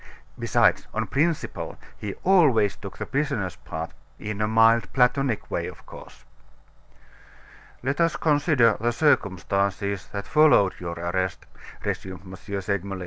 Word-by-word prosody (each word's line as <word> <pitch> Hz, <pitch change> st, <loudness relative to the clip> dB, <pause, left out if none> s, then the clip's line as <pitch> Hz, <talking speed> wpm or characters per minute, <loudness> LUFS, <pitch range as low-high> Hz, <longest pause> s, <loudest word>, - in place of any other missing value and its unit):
Besides, -, -, +2 dB
on -, -, 0 dB
principle, 155 Hz, +3 st, -2 dB, 0.2 s
he 105 Hz, -2 st, -6 dB
always 145 Hz, -, +4 dB
took 100 Hz, -, -10 dB
the -, -, -4 dB
prisoner's 135 Hz, -, -2 dB
part, 80 Hz, +1 st, -6 dB, 0.3 s
in 105 Hz, 0 st, -5 dB
a 105 Hz, -, +2 dB
mild, 115 Hz, -2 st, +4 dB
Platonic 130 Hz, -2 st, +1 dB
way, -, -, -2 dB
of -, -, -11 dB
course. -, -, -13 dB, 1.6 s
"Let 135 Hz, +5 st, -1 dB
us 165 Hz, 0 st, +2 dB
consider 145 Hz, -, +3 dB
the 120 Hz, +1 st, +1 dB
circumstances 100 Hz, -, 0 dB
that 100 Hz, 0 st, -6 dB
followed 150 Hz, -11 st, +5 dB
your 85 Hz, -1 st, -5 dB
arrest," 90 Hz, +2 st, -2 dB, 0.4 s
resumed 95 Hz, -2 st, -4 dB
M. 95 Hz, 0 st, -9 dB, 0.3 s
Segmuller. 100 Hz, 0 st, -3 dB
105 Hz, 130 wpm, -25 LUFS, 95-135 Hz, 1.6 s, followed